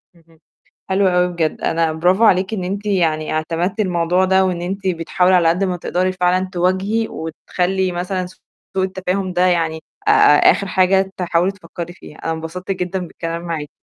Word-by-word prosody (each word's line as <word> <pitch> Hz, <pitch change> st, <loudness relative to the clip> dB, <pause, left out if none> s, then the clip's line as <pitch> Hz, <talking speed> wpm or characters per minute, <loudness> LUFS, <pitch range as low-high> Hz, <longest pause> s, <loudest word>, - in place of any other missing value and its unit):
اهم. 165 Hz, -1 st, -24 dB, 0.5 s
حلو 190 Hz, 0 st, +3 dB
أوي 180 Hz, 0 st, +3 dB
بجد، 160 Hz, -2 st, -1 dB
أنا 165 Hz, -1 st, +1 dB
برافو 180 Hz, +7 st, +2 dB
عليكِ 190 Hz, 0 st, +3 dB
إن 190 Hz, -, -2 dB
أنتِ 200 Hz, +3 st, -4 dB
يعني 165 Hz, -6 st, 0 dB
اعتمدتِ 165 Hz, +5 st, -2 dB
الموضوع 180 Hz, -2 st, +1 dB
ده، 190 Hz, 0 st, +3 dB
وإن 180 Hz, -2 st, -2 dB
أنتِ 190 Hz, +2 st, -4 dB
بتحاولي 180 Hz, +1 st, +2 dB
على 170 Hz, -2 st, +4 dB
قد 175 Hz, +4 st, +1 dB
ما 185 Hz, -2 st, -1 dB
تقدَري 180 Hz, +2 st, -1 dB
فعلًا 185 Hz, 0 st, +1 dB
تواجهي، 190 Hz, +5 st, 0 dB
وتخلّي 180 Hz, +3 st, -2 dB
مثلًا 180 Hz, +1 st, -3 dB, 0.5 s
سوء 190 Hz, -, +1 dB
التفاهم 185 Hz, 0 st, -3 dB
ده 180 Hz, +1 st, +2 dB
يعني 165 Hz, -3 st, 0 dB, 0.2 s
آآ، -, -, +6 dB, 0.4 s
آخر 200 Hz, -, -2 dB
حاجة 190 Hz, +1 st, +2 dB
تحاولي 180 Hz, +1 st, +1 dB
تفكّري 175 Hz, -2 st, -8 dB
فيها، 155 Hz, -4 st, -14 dB
أنا 165 Hz, -, -3 dB
انبسطت 165 Hz, +4 st, -6 dB
جدًا 185 Hz, 0 st, -2 dB
بالكلام 170 Hz, -1 st, -5 dB
معاكِ. 165 Hz, -4 st, -4 dB
180 Hz, 170 wpm, -19 LUFS, 170-190 Hz, 0.5 s, آآ